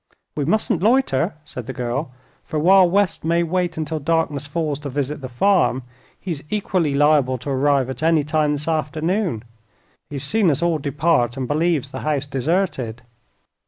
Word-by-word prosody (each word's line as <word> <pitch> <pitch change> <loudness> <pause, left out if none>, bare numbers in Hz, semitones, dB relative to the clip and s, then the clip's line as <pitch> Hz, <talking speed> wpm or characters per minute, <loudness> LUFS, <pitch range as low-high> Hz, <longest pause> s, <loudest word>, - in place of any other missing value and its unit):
"We 145 - -1
mustn't 180 0 +1
loiter," 230 - +2
said 125 -6 -8
the 130 - -4
girl, 125 +4 -2 0.3
"for 155 - -4
while 185 +3 +6
West 200 0 +1
may 170 +2 +2
wait 175 +1 -1
until 155 0 -2
darkness 150 -2 -1
falls 150 -2 -2
to 145 -1 -6
visit 140 +2 -3
the 130 - -6
farm, 130 -1 +2 0.4
he 185 - -5
is 150 -4 -5
equally 185 -8 0
liable 145 -3 +3
to 125 +4 -5
arrive 135 -1 +2
at 130 - -6
any 160 -1 +3
time 150 0 +1
this 145 +1 -4
afternoon. 160 - -1 0.7
He 145 - -7
has 135 - -3
seen 215 -5 +2
us 145 +2 +1
all 170 -2 +1
depart, 140 -3 +1
and 130 -2 -3
believes 155 -2 0
the - - -5
house 145 -2 -1
deserted." 135 - -1
150 Hz, 175 wpm, -21 LUFS, 135-170 Hz, 0.7 s, while